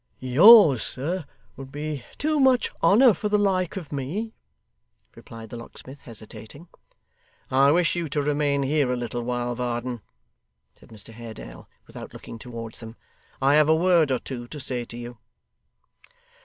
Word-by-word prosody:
'Yours, 150 - +7
sir, 160 +6 -2 0.3
would 135 -1 -10
be 150 -2 -5
too 305 0 0
much 260 -2 +3
honour 220 +8 +6
for 210 +2 -3
the 210 - +3
like 190 -3 0
of 170 -6 -8
me,' 165 - -4 0.8
replied 115 -1 -12
the 120 - -6
locksmith, 130 +3 -11
hesitating. 115 +7 -11 0.8
'I 135 +2 +4
wish 175 0 +2
you 170 -3 -3
to 145 0 -1
remain 145 -1 0
here 140 -1 +1
a - - 0
little 120 0 -4
while, 120 0 -2
Varden,' 120 -1 -4 0.7
said - - -21
Mr 110 0 -10
Haredale, 110 - -11 0.2
without - - -11
looking 115 - -10
towards 115 -3 -8
them. 115 0 -10 0.5
'I 135 +1 +4
have 150 0 +4
a 160 - +5
word 170 -2 +3
or 130 - +1
two 120 -1 -8
to 150 - -9
say 125 -3 -3
to 115 - -10
you. 120 -1 -9
135 Hz, 155 wpm, -24 LUFS, 120-165 Hz, 0.8 s, Yours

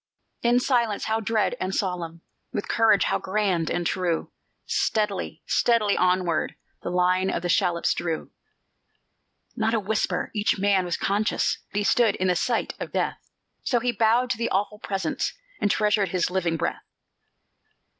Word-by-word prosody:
In 240 +1 +4
silence, 235 -5 +1
how 220 0 0
dread 225 +2 0
and 185 +1 -2
solemn! 170 -4 -3 0.3
With 205 - -3
courage, 225 -3 +4
how - - 0
grand 190 -4 0
and 175 - -1
true! 175 -2 -1 0.3
Steadily, 210 -3 -1
steadily 225 -4 +2
onward 180 -3 +1 0.3
The - - -4
line 180 +1 +2
of - - -2
the 175 - -1
shallops 175 -2 +2
drew. 165 -2 -3 1.2
Not 225 +1 +1
a - - +2
whisper! 215 +1 -1
Each 210 -1 +1
man 195 -1 +2
was 175 - -2
conscious 205 +3 0
He 205 0 0
stood 225 0 +3
in 185 0 0
the 180 - +3
sight 230 +6 0
of - - -6
death; - - -1 0.4
So 245 - +1
he 245 +1 0
bowed 235 +3 +2
to 235 - -2
the 235 - 0
awful 205 +2 -1
presence, 195 -2 -2 0.3
And 205 - +1
treasured 210 -2 +2
his 180 0 0
living 175 -3 0
breath. - - -2
200 Hz, 155 wpm, -25 LUFS, 180-220 Hz, 1.2 s, In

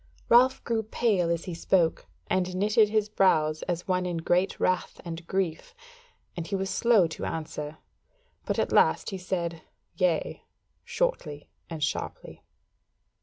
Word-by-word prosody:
Ralph 250 +2 +5
grew 230 -1 0
pale 210 -5 0
as 170 -1 -1
he 180 - -5
spoke 165 - +1 0.2
and 185 - -1
knitted 210 +2 +3
his 215 -1 +1
brows 155 -7 +2
as 175 0 -3
one 180 -1 0
in 175 -1 -2
great 175 +3 0
wrath 185 -1 0
and 165 0 -7
grief; 190 - -2 0.6
and 170 -1 -5
he 200 - -2
was 190 0 -2
slow 230 -6 +4
to 160 - -7
answer; 155 -1 -5 0.7
but - - -2
at - - 0
last - - +3
he 190 - -5
said 170 -3 -3 0.3
"Yea," 180 -4 0 0.4
shortly 475 - -2 0.2
and 160 -3 -4
sharply. 145 - -4
180 Hz, 145 wpm, -27 LUFS, 165-210 Hz, 0.7 s, Ralph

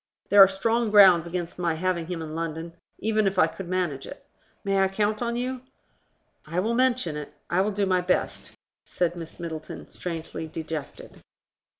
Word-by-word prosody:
There 200 0 +8
are 195 - +11
strong 225 +4 0
grounds 190 -5 +7
against 175 0 -5
my 170 -2 0
having 170 -1 -1
him 170 -2 -4
in 155 -1 -7
London, 165 0 -4 0.2
even 215 -1 +1
if 190 0 -1
I - - +6
could 190 - -7
manage 175 -7 -2
it. 280 - -11 0.4
May 195 -1 +1
I 195 - +4
count 210 +3 -1
on 235 -1 -1
you?" 250 +1 -3 0.9
"I 165 +3 -1
will 220 +5 0
mention 250 -9 +1
it: 150 -1 -6 0.2
I 180 +2 +3
will 200 - +1
do 200 -1 0
my 185 -1 +2
best," 180 +1 -1 0.3
said 175 -1 -1
Miss 165 0 -9
Middleton, 160 -2 -7
strangely 165 -2 -5
dejected. 160 -2 -7
185 Hz, 180 wpm, -26 LUFS, 165-205 Hz, 0.9 s, are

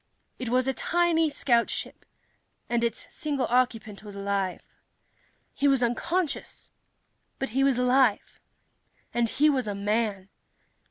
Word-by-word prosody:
It 250 - -3
was 255 +2 +2
a 265 - +1
tiny 335 +3 +2
scoutship, 240 -5 0 0.6
and 235 -1 0
its 230 -1 -1
single 285 -4 -1
occupant 230 -5 0
was 205 -1 -10
alive. 200 -2 -2 0.9
He 285 - +1
was 270 -3 +3
unconscious, 330 +8 -2 0.7
but 270 - -3
he 265 +5 +1
was 275 -3 +3
alive. 250 -3 +2 0.7
And 235 -1 +1
he 295 +6 +3
was 265 -6 +1
a 205 - -2
man! 205 -1 -1
245 Hz, 125 wpm, -27 LUFS, 215-275 Hz, 0.9 s, was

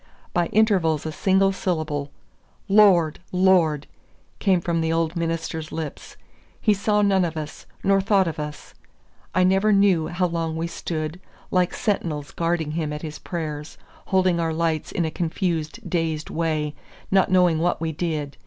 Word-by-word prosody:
By 175 -1 +2
intervals 185 -9 +2
a 160 - -2
single 190 +4 +3
syllable, 155 -6 -2 0.6
"Lord! 195 -6 +5
Lord!" 180 -6 +3 0.5
came 190 -3 +3
from 170 -1 -1
the 160 0 0
old 165 0 0
minister's 165 -1 -3
lips. 160 -3 -6 0.4
He 215 - +3
saw 210 +1 +1
none 195 -2 +3
of 165 -2 -2
us, 155 -1 -7 0.2
nor 195 0 +3
thought 195 -1 +3
of 160 -2 -4
us. 150 0 -7 0.6
I 185 - +4
never 195 +3 +3
knew 195 -5 +4
how 175 +1 0
long 165 -2 -2
we 165 - -1
stood, 165 -1 -4 0.3
like 180 -1 +1
sentinels 160 -9 -2
guarding 165 -2 -1
him 155 -1 -2
at 150 +1 -6
his 155 -1 -6
prayers, 155 -4 -5 0.3
holding 185 -2 +2
our 165 -1 0
lights 160 -2 -1
in 170 - 0
a 160 - -2
confused 165 -2 -2
dazed 160 -3 -2
way, 155 -2 -1 0.4
not 190 -1 +4
knowing 180 -3 +4
what 175 +2 +1
we 160 0 -2
did. 150 -3 -3
170 Hz, 160 wpm, -23 LUFS, 155-185 Hz, 0.6 s, Lord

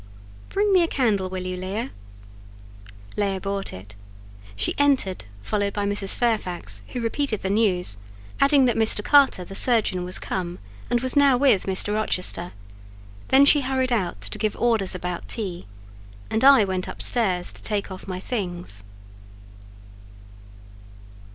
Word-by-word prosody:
Bring 405 0 +1
me 370 - +5
a 335 - +2
candle 210 -11 0
will 185 0 -5
you 185 0 -3
Leah?" 195 +7 -4 1.2
Leah 200 -2 -1
brought 195 0 -3
it; 100 +3 -11 0.6
she 100 - -1
entered, 270 - +2 0.2
followed 200 - -1
by 205 -1 -2
Mrs. 200 -1 -1
Fairfax, 185 - -1
who 245 - -5
repeated 230 -1 -2
the 190 - -1
news; 185 - +1 0.4
adding 275 -1 +5
that 245 - +2
Mr. 220 -2 +4
Carter 275 -10 +4
the 195 - -10
surgeon 210 -5 +2
was 180 +1 -3
come, 180 -2 -4 0.3
and 240 - +1
was 260 0 -2
now 280 -3 +5
with 250 -9 +3
Mr. 190 +2 +1
Rochester: 180 -4 -1 0.8
then 270 +1 +6
she 290 0 +5
hurried 260 -1 -1
out 190 -7 -1
to - - -5
give 215 -2 -1
orders 220 -6 +1
about 180 -1 -5
tea, 185 - -5 0.6
and 220 - 0
I 270 -4 +8
went 185 -1 -3
upstairs 185 -7 0
to - - -13
take 205 -2 -3
off 190 - -9
my 185 -1 -4
things. 175 - -4
205 Hz, 145 wpm, -23 LUFS, 185-245 Hz, 1.2 s, I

